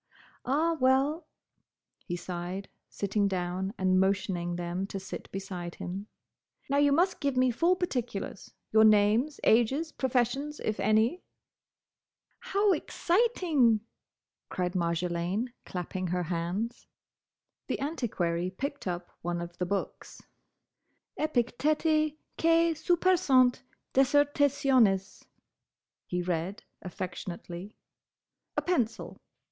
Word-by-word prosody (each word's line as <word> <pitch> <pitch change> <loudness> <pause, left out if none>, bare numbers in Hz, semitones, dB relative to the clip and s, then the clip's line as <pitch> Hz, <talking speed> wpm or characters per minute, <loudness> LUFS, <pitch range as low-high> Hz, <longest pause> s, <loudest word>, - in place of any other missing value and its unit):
"Ah, 320 +5 +2
well!" 270 +5 +2 0.8
he 175 - -2
sighed, 180 +2 -5 0.2
sitting 200 0 0
down 185 0 -2
and 185 0 +3
motioning 190 -2 0
them 175 +2 -3
to 195 - -5
sit 190 - -8
beside 185 -3 -5
him. 195 +4 -6 0.6
"Now 280 - +1
you 285 0 +4
must 355 +6 +2
give 280 -3 -1
me 255 0 +4
full 340 +9 +3
particulars: 245 - -4 0.2
your 220 0 +6
names, 215 +7 +4
ages, 265 +8 +3
professions, 265 +3 -1
if 215 - -2
any—" 220 +11 +2 1.2
"How 420 -4 +2
exciting!" 335 - +2 0.7
cried 180 -1 -2
Marjolaine, 175 +5 -1 0.2
clapping 185 +1 -4
her 180 +1 -1
hands. 175 +7 -3 0.8
The - - -2
Antiquary 185 - -1
picked 275 +6 -5
up 175 0 -4
one 175 0 -2
of 170 0 -6
the 180 - -1
books. 200 +1 -4 1.0
"'Epicteti 305 +3 +1 0.2
quæ 330 0 +4
supersunt 315 -6 +3 0.3
Dissertationes,'" 270 -7 +3 0.8
he 180 0 -2
read, 175 +3 -2 0.2
affectionately. 180 +1 -6 0.8
"A - - +1
pencil! 240 -11 -1
220 Hz, 100 wpm, -29 LUFS, 180-290 Hz, 1.2 s, your